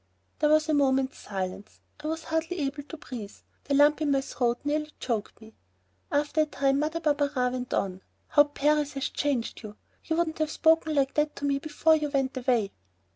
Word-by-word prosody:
There 300 - +3
was 310 +1 +4
a 310 - +1
moment's 270 -1 +2
silence. 195 0 -6 0.2
I 300 - -5
was 320 0 -3
hardly 320 +3 -2
able 280 +1 -2
to 315 +3 -10
breathe. 225 -8 -8 0.3
The 285 - +1
lump 295 +2 +5
in 300 - +1
my 275 -1 +3
throat 245 -2 -1
nearly 300 +1 -1
choked 225 -5 -3
me. 220 0 -15 0.6
After 295 +1 +1
a - - +3
time 275 -1 +1
Mother 315 +3 -1
Barberin 285 -5 +1
went 250 0 -4
on: 190 -1 -2 0.3
"How 290 -1 +6
Paris 295 0 +1
has 275 -1 -2
changed 275 -5 -2
you! 210 -2 -9 0.3
You 320 - 0
wouldn't 325 -1 -1
have 310 -1 +1
spoken 320 0 +3
like 275 -1 +2
that 300 0 0
to 285 - -4
me 280 -1 +1
before 310 +2 +3
you 300 -1 -2
went 270 -2 0
away." 245 -5 +1
285 Hz, 195 wpm, -27 LUFS, 260-305 Hz, 0.6 s, How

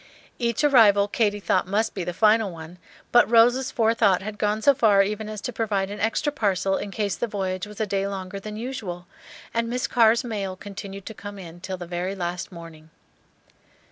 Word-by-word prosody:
Each 235 +1 0
arrival 215 -8 +6
Katy 205 -1 0
thought 195 - +1
must 215 +3 0
be 190 - -4
the 180 - -3
final 215 +3 +3
one; 165 +1 -11 0.3
but 240 - +5
Rose's 240 +3 +4
forethought 220 -5 +2
had 210 0 -6
gone 210 +1 0
so 280 - +6
far 210 -6 +4
even 210 +2 -4
as 215 -1 -6
to 250 - -4
provide 200 -4 -1
an 205 - -6
extra 225 +8 0
parcel 195 -7 0
in 200 - -4
case 200 -1 -2
the 240 - -2
voyage 190 -2 -3
was 210 -1 -11
a 220 - +1
day 195 -1 -1
longer 195 0 -5
than 210 +1 -7
usual, 210 -8 -5 0.5
and 230 0 0
"Miss 250 +2 -1
Carr's 230 0 +4
mail" 200 -6 -4
continued 195 0 -9
to 220 - -7
come 205 -1 -9
in 175 -2 -10
till 190 0 -5
the 175 - -7
very 180 +3 -3
last 175 -1 -4
morning. 165 -2 -12
205 Hz, 200 wpm, -24 LUFS, 190-225 Hz, 0.5 s, arrival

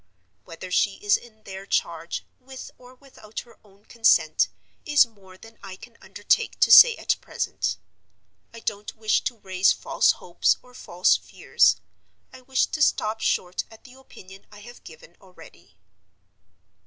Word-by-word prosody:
Whether 180 +2 -10
she 195 +2 +1
is 205 0 +1
in 220 -2 -11
their 195 0 -10
charge, 170 -3 -3
with 260 0 -11
or 250 +1 -17
without 255 -5 -11
her 235 - -21
own 200 0 -25
consent, 230 -1 +2 0.4
is 290 -1 +4
more 195 -5 -19
than 225 +2 -17
I 195 -2 -9
can 230 +4 -16
undertake - - -1
to - - +4
say 485 -2 +9
at - - -1
present. - - -3 0.7
I 230 - -12
don't 205 -1 -5
wish 220 -1 0
to 245 - -3
raise 190 -2 +1
false - - +1
hopes - - 0
or 250 - -20
false 180 -7 +1
fears; - - +1 0.6
I 260 - -13
wish 260 0 0
to 310 - -6
stop 220 -5 +1
short 180 0 -1
at 220 - -17
the 255 - -16
opinion 195 -7 -16
I 205 - -14
have 240 +3 -14
given 165 +1 -15
already. 95 - -18
215 Hz, 155 wpm, -24 LUFS, 190-245 Hz, 0.7 s, say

